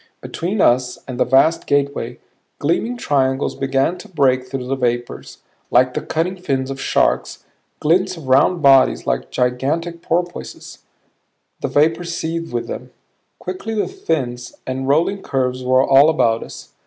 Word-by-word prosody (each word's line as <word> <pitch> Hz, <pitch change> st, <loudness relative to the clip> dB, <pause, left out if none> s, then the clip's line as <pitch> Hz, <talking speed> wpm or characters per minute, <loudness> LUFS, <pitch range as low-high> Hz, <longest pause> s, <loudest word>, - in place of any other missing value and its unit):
Between 190 Hz, +4 st, -3 dB
us 125 Hz, 0 st, +2 dB
and 130 Hz, -2 st, -6 dB
the -, -, +3 dB
vast 155 Hz, +6 st, +3 dB
gateway, 140 Hz, -4 st, -1 dB, 0.4 s
gleaming 195 Hz, +11 st, -1 dB
triangles 135 Hz, -, 0 dB
began 135 Hz, +6 st, 0 dB
to -, -, -11 dB
break 130 Hz, -6 st, +1 dB
through 130 Hz, -1 st, -5 dB
the 135 Hz, +2 st, -1 dB
vapors, 120 Hz, -2 st, -3 dB, 0.3 s
like 125 Hz, +1 st, +3 dB
the -, -, -2 dB
cutting 175 Hz, +4 st, -2 dB
fins 135 Hz, -5 st, -1 dB
of 135 Hz, -, -6 dB
sharks, -, -, 0 dB, 0.3 s
glints 185 Hz, +4 st, +1 dB
of 150 Hz, -5 st, -10 dB
round 145 Hz, +6 st, +3 dB
bodies 135 Hz, -1 st, +5 dB
like -, -, -1 dB
gigantic 145 Hz, +8 st, -1 dB
porpoises 175 Hz, +1 st, -4 dB, 0.8 s
the -, -, -2 dB
vapors 165 Hz, +3 st, +1 dB
seethed 165 Hz, +1 st, -4 dB
with 120 Hz, -1 st, -2 dB
them. 125 Hz, +1 st, -7 dB, 0.5 s
Quickly 185 Hz, +5 st, -5 dB
the 210 Hz, -, 0 dB
fins 130 Hz, -, -3 dB
and 130 Hz, +1 st, -3 dB
rolling 170 Hz, +8 st, +1 dB
curves 130 Hz, -4 st, -1 dB
were 130 Hz, +1 st, +3 dB
all 140 Hz, +3 st, +6 dB
about 115 Hz, -8 st, +2 dB
us. -, -, -10 dB
140 Hz, 150 wpm, -19 LUFS, 130-165 Hz, 0.8 s, all